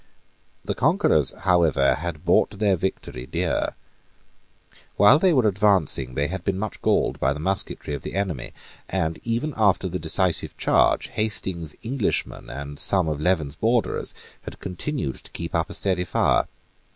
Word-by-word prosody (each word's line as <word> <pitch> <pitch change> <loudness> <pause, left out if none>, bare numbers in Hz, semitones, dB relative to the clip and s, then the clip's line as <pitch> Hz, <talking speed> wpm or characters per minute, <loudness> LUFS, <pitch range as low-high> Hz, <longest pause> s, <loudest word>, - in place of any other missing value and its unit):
The - - -1
conquerors - - +2
however 85 -7 +3
had 85 +1 -5
bought 95 +3 +2
their 100 -2 +2
victory 80 -8 -4
dear. - - -1 1.2
While 105 +9 +7
they 185 +1 +4
were 130 -8 +3
advancing, 95 -11 +2
they 70 - +1
had 90 +3 -4
been 95 -1 -1
much 105 +2 -5
galled - - +1
by 70 +1 +2
the 75 - -7
musketry 95 -3 -3
of 70 - -4
the - - -7
enemy; 95 -10 -2 0.4
and, 80 -4 -1
even 120 +6 -2
after 100 -3 +2
the 90 +1 -4
decisive 85 +2 0
charge, - - +2
Hastings's 95 -7 0
Englishmen 120 -2 -2
and 70 0 -6
some 95 -4 +3
of 75 -1 -2
Leven's 80 -5 +1
borderers 115 +5 0 0.3
had - - -10
continued 90 - -4
to - - -15
keep 85 0 -5
up 85 0 0
a - - -5
steady 95 -3 0
fire. - - +2
90 Hz, 155 wpm, -24 LUFS, 80-100 Hz, 1.2 s, While